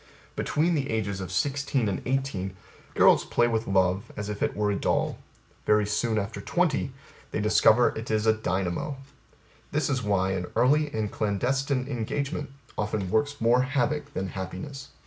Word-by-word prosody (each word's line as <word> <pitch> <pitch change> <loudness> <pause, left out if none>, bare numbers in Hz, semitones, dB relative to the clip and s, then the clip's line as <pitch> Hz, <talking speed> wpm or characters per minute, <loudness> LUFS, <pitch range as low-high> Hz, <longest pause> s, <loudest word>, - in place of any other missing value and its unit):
Between 165 +4 +1
the 140 -4 -1
ages 100 -3 -1
of 95 -1 -5
sixteen 140 +2 0
and 100 - -2
eighteen, 125 -8 -1 0.4
girls - - +6
play 120 - +2
with 115 -1 -1
love 95 0 +1
as 105 0 -4
if 105 -1 -5
it - - 0
were 105 0 +1
a - - 0
doll; - - 0 0.5
very 105 -1 +4
soon 105 +2 0
after 105 +2 -3
twenty 165 -6 0 0.4
they - - -2
discover 110 +2 +5
it 110 +1 -6
is 110 0 +1
a 110 - +5
dynamo. 95 - -2 0.7
This 150 -1 0
is 130 -2 0
why 100 -3 +1
An 90 -2 -2
early 145 +4 +3
and 110 -4 -2
clandestine 130 +6 0
engagement 140 +4 -3 0.3
often 105 -3 -1
works 145 +6 +1
more 120 +2 +4
havoc 140 +3 -1
than 95 0 -2
happiness. 95 +10 -6
110 Hz, 165 wpm, -27 LUFS, 100-135 Hz, 0.7 s, girls